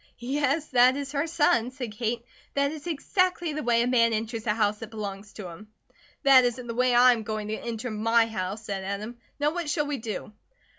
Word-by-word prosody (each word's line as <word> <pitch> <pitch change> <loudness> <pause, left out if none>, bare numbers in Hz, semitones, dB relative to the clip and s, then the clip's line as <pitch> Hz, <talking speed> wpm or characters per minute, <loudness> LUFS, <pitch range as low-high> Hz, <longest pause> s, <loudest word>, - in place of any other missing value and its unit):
"Yes, 285 +4 -1
that 255 +1 +5
is 280 -1 -4
her 290 +2 -1
son," 290 -7 +2
said 255 -3 -6
Kate. 230 +2 -3 0.3
"That 280 0 +2
is 310 +1 -8
exactly 350 0 0
the 305 - -3
way 235 -2 +2
a - - 0
man 230 -2 +3
enters 225 +1 -3
a 210 - +3
house 210 -1 +1
that 225 - -7
belongs 205 -2 -6
to 200 -4 -7
him." 175 +6 -11 0.6
"That 270 -2 +7
isn't 245 0 -1
the 230 - -4
way 250 +1 +2
I 250 +1 +7
am 230 - -3
going 215 -1 -4
to 215 - -1
enter 235 +1 -4
my 225 +2 +3
house," 215 -1 -4
said 195 -3 -4
Adam. 210 +5 -5 0.2
"Now 295 +2 +1
what 345 -3 -3
shall 295 -1 0
we 290 -1 -2
do?" 215 -1 -6
240 Hz, 215 wpm, -27 LUFS, 215-280 Hz, 0.6 s, That